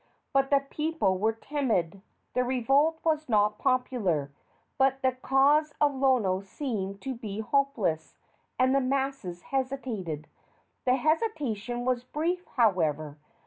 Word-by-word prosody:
But 270 0 +3
the 280 -1 +4
people 300 - 0
were 220 +3 +2
timid. 225 - -1 0.3
The 250 - +2
revolt 270 +6 +2
was 310 -3 0
not 210 -1 +2
popular, 210 - 0 0.5
but 270 0 +2
the 260 - +4
cause 275 +4 +2
of 290 -1 +3
Lono 250 -9 +2
seemed 195 -2 -4
to 265 -1 -3
be 215 -4 -6
hopeless, 220 - 0 0.4
and 255 +1 +3
the 275 - +3
masses 265 -9 -2
hesitated. 250 - -3 0.6
The 250 0 +4
hesitation 260 - -1
was 250 -1 0
brief, 335 +7 -2
however. 155 - +1
255 Hz, 125 wpm, -28 LUFS, 200-275 Hz, 0.6 s, the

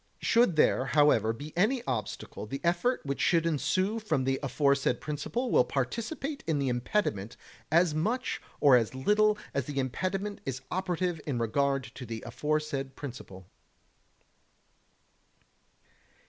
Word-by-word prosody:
Should 235 -7 +3
there, 135 -3 +3
however, 135 -6 +4
be 145 +7 -8
any 225 +8 +2
obstacle, 110 -3 -4
the 135 +5 -4
effect 175 +8 +1
which 140 0 -2
should 170 -3 +3
ensue 175 +8 0
from 160 -11 0
the 135 +1 0
aforesaid 140 -2 +1
principle 155 - -3
will - - +5
participate 275 +4 -3
in 160 -3 +1
the 140 -2 0
impediment 120 - -1 0.3
as 170 0 +4
much 220 +11 -1 0.2
or 140 -3 +7
as 120 0 +1
little 210 +9 +3 0.2
as 140 -3 -1
the 145 -2 -6
impediment 190 - -2
is 130 0 -4
operative 180 -3 -1
in 135 -4 -1
regard 135 +4 +1
to 125 +2 -9
the 115 0 -6
aforesaid 145 0 -2
principle. 105 -9 -9
150 Hz, 135 wpm, -29 LUFS, 130-185 Hz, 0.3 s, or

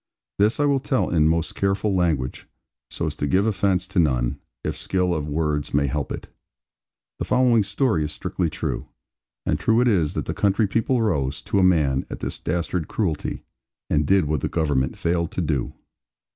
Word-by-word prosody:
This 105 +5 +3
I 145 - +3
will 140 -1 +3
tell 130 -1 0
in 80 -3 +4
most 80 0 0
careful 100 +1 0
language, 80 -8 0 0.4
so 85 - -3
as 80 - -2
to 75 - -1
give 95 +6 +2
offence 95 -3 +1
to 95 - 0
none, 60 -7 +1 0.2
if - - -2
skill 90 -2 0
of 75 -3 -2
words 75 -2 -1
may 70 -1 +3
help 70 0 -2
it. - - -5 0.5
* - - -68 0.2
*The - - -2
following 125 -3 +4
story 100 - +1
is 75 - -3
strictly 85 -3 -2
true; - - -3 0.6
and - - 0
true 115 +1 +3
it 125 - +3
is 85 -10 +2
that - - -2
the - - -2
country 100 +2 +2
people 115 +5 +1
rose, 70 -11 0
to 100 - 0
a - - +4
man, 75 -7 +3
at - - -6
this - - -4
dastard 85 -1 -2
cruelty, 85 -9 -2 0.5
and 75 -1 +2
did 95 -2 +4
what 75 -2 -1
the - - -1
Government 70 -6 0
failed 85 0 0
to - - -1
do. 75 -6 -1
85 Hz, 195 wpm, -23 LUFS, 75-100 Hz, 0.6 s, in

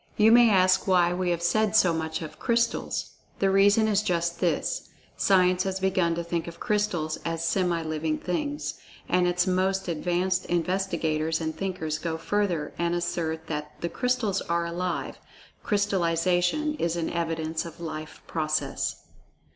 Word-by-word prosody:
You 220 +1 +6
may 240 0 +7
ask 185 -1 +4
why 175 -2 +4
we 180 0 -1
have 170 -1 -1
said 215 +4 +2
so 180 -5 +5
much 160 0 -3
of 155 -1 -9
Crystals. 235 -1 0 0.3
The 195 -1 +2
reason 205 +3 +5
is 210 -1 +2
just 170 -3 -1
this—Science 185 - +1
has 190 0 -2
begun 185 -3 +1
to 170 - -3
think 170 0 -3
of 170 0 -9
Crystals 195 -7 -1
as 165 0 -2
semi 175 -2 +1
living 155 0 -1
things, 290 +11 -3 0.3
and 180 0 +2
its 175 0 +2
most 190 +1 0
advanced 180 +2 0
investigators 170 -3 0
and[Pg 160 -1 -2
50] - - -19
thinkers 160 -5 -2
go 165 0 -3
further 175 -4 -1
and 170 0 +1
assert 160 -2 -2
that 150 -1 -5
"the 170 - -1
Crystals 250 -1 0
are 170 0 -1
alive—Crystallization 180 - -1
is 170 0 0
an 170 -1 -2
evidence 160 -1 -2
of 170 -1 -10
life 155 -2 -7
process." 155 -1 -2
175 Hz, 150 wpm, -26 LUFS, 165-190 Hz, 0.3 s, may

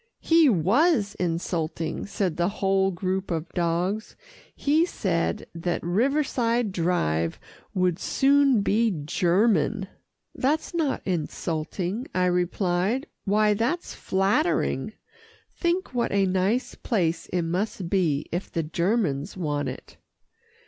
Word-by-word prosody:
"He 325 -3 +5
was 215 - +3
insulting," 165 -1 -2
said 195 -5 -1
the 175 +1 +1
whole 195 -1 +1
group 190 +1 -2
of 165 -1 -2
dogs. 175 +5 -1 0.4
"He 305 +3 +2
said 185 - -1
that 170 +1 -2
Riverside 240 - +1
Drive 125 - 0 0.4
would 180 -2 +1
soon 275 -4 +3
be 225 +3 +2 0.2
German." 190 +3 +2 0.5
"That's 300 +6 0
not 320 -5 -1
insulting," 175 - -3
I 185 0 +3
replied, 180 - 0 0.2
"why, 210 +1 +3
that's 240 +12 -1
flattering. 200 - 0 0.6
Think 345 -3 -1
what 240 -1 0
a 195 -1 +3
nice 195 +7 0
place 170 -7 -1
it 180 -1 -1
must 180 +2 -2
be, 170 -6 +1
if 175 +3 -3
the 165 - -1
Germans 170 -2 -1
want 145 -4 -1
it." - - -10
190 Hz, 115 wpm, -25 LUFS, 170-235 Hz, 0.6 s, He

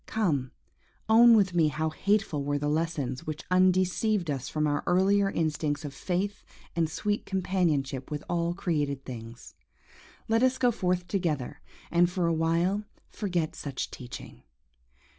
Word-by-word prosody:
Come! 155 -12 0 0.6
own 230 +1 +7
with 195 -4 +3
me 165 -3 +4
how 155 +2 -1
hateful 200 -4 0
were 145 +1 0
the 145 +1 -2
lessons 150 -5 -2
which 155 0 -4
undeceived 185 0 +2
us 135 -2 -4
from 155 -1 0
our 145 -1 0
earlier 195 +2 +3
instincts 155 -3 -1
of 140 - -6
faith 190 +7 -2 0.3
and 165 -2 +1
sweet 205 +5 -1
companionship 165 -9 0
with 150 -1 -4
all 170 0 0
created 145 -7 -1
things: 115 -1 -9
and - - -27
let 225 +1 +3
us 260 0 +3
go 245 -2 +3
forth 180 -4 -1
together, 160 -6 -2 0.3
and 175 0 +4
for 180 -1 -1
a 170 - +2
while 170 +5 +1 0.3
forget 175 -6 -2
such 140 -4 -4
teaching. 120 - -9
170 Hz, 150 wpm, -28 LUFS, 145-190 Hz, 0.6 s, own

